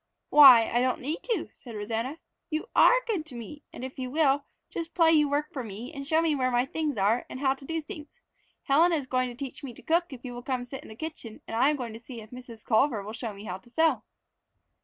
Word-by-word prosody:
"Why, 260 -6 +9
I 240 - +3
don't 255 0 +1
need 300 +6 -3
to," 455 -9 -1
said 235 -4 -11
Rosanna. 225 +7 -3 0.3
"You 315 +8 -3
are - - +6
good 420 -9 -1
to 265 - -10
me, 240 +6 -8
and 255 - -7
if 260 0 -9
you 255 -1 -3
will, 285 -1 +2 0.2
just 335 -1 -6
play 330 -2 +5
you 300 -2 +4
work 290 +1 -1
for 260 - -4
me 225 +6 -8
and 275 -2 -7
show 320 +2 +3
me 325 -2 +2
where 255 -3 +1
my 245 0 +2
things 295 -2 -2
are 205 +5 +2
and 255 - -7
how 265 -1 +2
to 270 0 -13
do 325 +3 -2
things. 300 -1 -11 0.4
Helen 325 +6 +4
is 295 -5 0
going 255 -1 0
to 240 - -9
teach 265 +2 -7
me 250 -4 -7
to - - -14
cook 340 +1 +1
if 260 -1 -10
you 245 - -5
will 245 - -7
come 255 -1 -2
sit 270 +2 -8
in - - -13
the 220 - -10
kitchen 255 -5 -7
and - - -5
I 255 +5 +4
am 300 - +1
going 245 -5 -5
to 225 - -9
see 235 0 -10
if 215 -1 -12
Mrs. 245 -3 -11
Culver 225 -2 +2
will 215 +2 -7
show 225 0 -5
me 200 0 -11
how 185 -3 -5
to 215 - -20
sew." 320 +6 +2
265 Hz, 265 wpm, -28 LUFS, 235-300 Hz, 0.4 s, Why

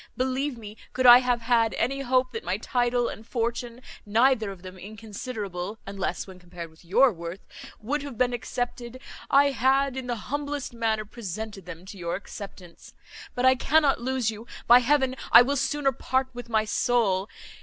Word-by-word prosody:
Believe 260 +1 -1
me, 215 -1 -10 0.2
could 255 - 0
I 245 0 +11
have 250 -2 0
had 230 -1 +2
any 270 +4 -1
hope 255 -1 +1
that 455 - -6
my - - -1
title 245 -1 0
and 220 - -7
fortune, 235 +1 -3 0.2
neither 225 +1 +2
of 190 -2 -10
them 185 0 -9
inconsiderable, 210 -2 -6
unless 195 -1 -3
when 190 -2 -12
compared 175 -2 -9
with 160 - -21
your 215 +8 +4
worth, 170 +2 -7 0.4
would 275 +7 -2
have 280 -5 -8
been 250 0 +2
accepted, 245 +1 -4 0.3
I 280 +1 +5
had, 270 +2 +2
in 260 -1 -5
the 240 - -1
humblest 285 +3 -4
manner, 220 -2 -1
presented 210 -2 -7
them 180 0 -9
to 195 0 -10
your 170 -1 -2
acceptance. 190 -3 -10 0.4
But 250 - 0
I 260 - +7
cannot 280 +1 +2
lose 255 -2 0
you. 220 +2 -10 0.2
By 240 +1 +8
heaven, 265 0 +2 0.2
I 245 - +10
will 280 +3 -1
sooner 280 +1 +1
part 260 +1 -1
with 245 0 -8
my 220 -1 +2
soul! 210 -4 +1
240 Hz, 175 wpm, -26 LUFS, 205-260 Hz, 0.4 s, I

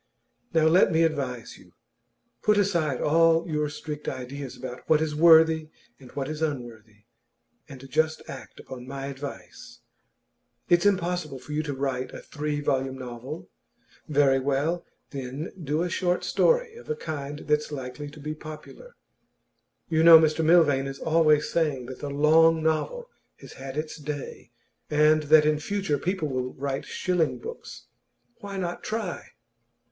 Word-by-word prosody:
Now 160 -1 +3
let 175 +4 +5
me 165 0 +3
advise 135 -7 -2
you; - - -20 0.7
put 210 -1 +3
aside 170 -9 +1
all 165 +2 +3
your 150 -2 -1
strict 150 0 -7
ideas 130 +1 -7
about 125 0 -7
what 155 - +5
is 155 -1 -1
worthy 160 0 +5 0.3
and 130 -2 -14
what 135 -2 -3
is 155 +1 -5
unworthy, 115 -8 -5 0.7
and 135 -1 -10
just 155 +4 0
act 135 - -10
upon 125 -1 -10
my 135 0 -5
advice. 135 -10 -9 0.9
It's 175 +3 +4
impossible 175 -6 -1
for 130 +3 -12
you 150 +1 0
to 145 -3 -4
write 130 -1 -3
a - - -7
three 150 0 -3
volume 135 -2 -1
novel; 130 +4 -8 0.6
very 140 -3 +3
well, 145 +6 -1 0.2
then 135 +3 -5
do 150 +3 0
a - - -1
short 180 0 0
story 485 -1 +2
of 475 - -13
a 460 - 0
kind 145 - -6
that's 150 0 0
likely 140 +1 -6
to 150 - -13
be 150 +1 -4
popular. 155 - -11 0.9
You 160 -1 +1
know 165 0 +10
Mr 160 0 +2
Milvain 155 -5 +4
is 135 0 -6
always 155 -2 +3
saying 150 -7 0
that 130 +1 -9
the 145 - -5
long 160 +3 +4
novel 160 - -1 0.3
has - - -13
had 135 +1 -8
its 155 +1 -4
day, 145 -5 -7 0.4
and 150 +1 +4
that 155 -1 +7
in 150 0 +2
future 180 -3 -1
people 180 0 -1
will 130 -2 -3
write 135 0 -3
shilling 180 -4 0
books. 465 +2 -9 0.5
Why 200 -1 -7
not 175 -2 -3
try? 215 -5 -4
150 Hz, 155 wpm, -26 LUFS, 135-165 Hz, 0.9 s, know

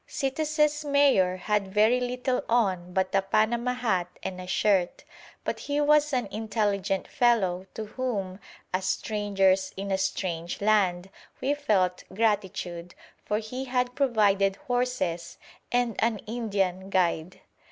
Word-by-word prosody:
Citas's 300 +2 0
mayor 280 -11 +3
had 200 0 -1
very 215 +5 +4
little 250 +1 -1
on 190 -7 +1
but 190 +1 0
a 195 - +4
panama 225 +5 +1
hat 190 -8 0 0.2
and 185 -1 -5
a 180 - -9
shirt, 185 -1 +1 0.4
but - - -3
he 290 0 -2
was 300 0 +4
an 250 -4 0
intelligent 205 -3 -1
fellow 190 -7 +1
to 220 - -4
whom, 210 -5 -3 0.3
as 185 0 0
strangers 195 -1 +1
in 195 +1 -4
a 190 - +1
strange 175 -3 -2
land, 195 -3 +2 0.3
we 270 +2 +1
felt 195 -11 +1
gratitude, 190 -5 -1 0.3
for 210 - -1
he 250 +5 -5
had 250 -1 0
provided 205 -7 +2
horses 245 - -2 0.3
and 245 -2 +1
an 230 -1 +2
Indian 195 -5 -2
guide. 180 -2 0
210 Hz, 130 wpm, -27 LUFS, 190-250 Hz, 0.4 s, very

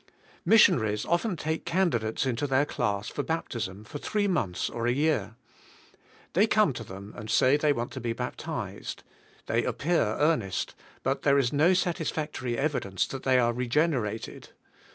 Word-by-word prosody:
Missionaries 120 - +4
often 175 +3 0
take 160 +1 -2
candidates 165 -12 0
into 130 +2 -1
their 135 +1 +3
class 100 -7 -2
for 145 - -3
baptism 115 - -3
for 145 +6 -8
three 205 +5 0
months 105 - 0
or 115 0 -3
a - - +3
year. 145 -3 0 1.0
They 205 +5 +4
come 215 -8 +3
to 115 - -6
them 100 0 -10
and 110 +1 -8
say 130 +5 +4
they 150 0 +2
want 120 -3 -2
to 130 - -6
be 120 0 -1
baptized. 125 +2 -5 0.4
They - - +1
appear 170 +3 +1 0.2
earnest, 120 - 0 0.3
but 135 +1 0
there 140 -1 +4
is 135 -2 +1
no 160 +6 +4
sat 175 -2 0
isfactory 150 -6 -3
evidence 130 - 0
that 135 - -6
they 130 -1 +3
are 120 -1 +3
regenerated. 125 -3 -1
135 Hz, 160 wpm, -28 LUFS, 115-160 Hz, 1.0 s, Missionaries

